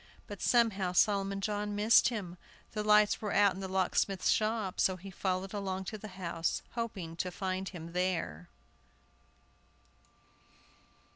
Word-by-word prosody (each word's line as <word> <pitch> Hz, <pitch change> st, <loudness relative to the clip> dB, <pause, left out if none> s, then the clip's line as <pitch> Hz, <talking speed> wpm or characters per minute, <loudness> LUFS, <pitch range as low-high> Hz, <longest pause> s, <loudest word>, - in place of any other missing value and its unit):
But 205 Hz, -3 st, -9 dB
somehow 205 Hz, -7 st, +2 dB
Solomon 195 Hz, 0 st, +2 dB
John 205 Hz, 0 st, -2 dB
missed 215 Hz, +3 st, +5 dB
him; 185 Hz, -7 st, -6 dB, 0.3 s
the 210 Hz, -1 st, -3 dB
lights 210 Hz, 0 st, +4 dB
were 210 Hz, -2 st, -2 dB
out 200 Hz, -1 st, +5 dB
in 190 Hz, -, -8 dB
the 190 Hz, -, -4 dB
locksmith's 190 Hz, 0 st, +1 dB
shop, 215 Hz, -3 st, 0 dB
so 190 Hz, -, +3 dB
he 190 Hz, +2 st, -10 dB
followed 190 Hz, +1 st, -2 dB
along 190 Hz, -2 st, -3 dB
to -, -, -4 dB
the 215 Hz, -, -8 dB
house, 170 Hz, -2 st, -2 dB
hoping 205 Hz, -8 st, -4 dB
to 180 Hz, -, -1 dB
find 190 Hz, 0 st, -3 dB
him 170 Hz, -2 st, -9 dB
there. 175 Hz, -, -2 dB
195 Hz, 140 wpm, -32 LUFS, 185-210 Hz, 0.3 s, missed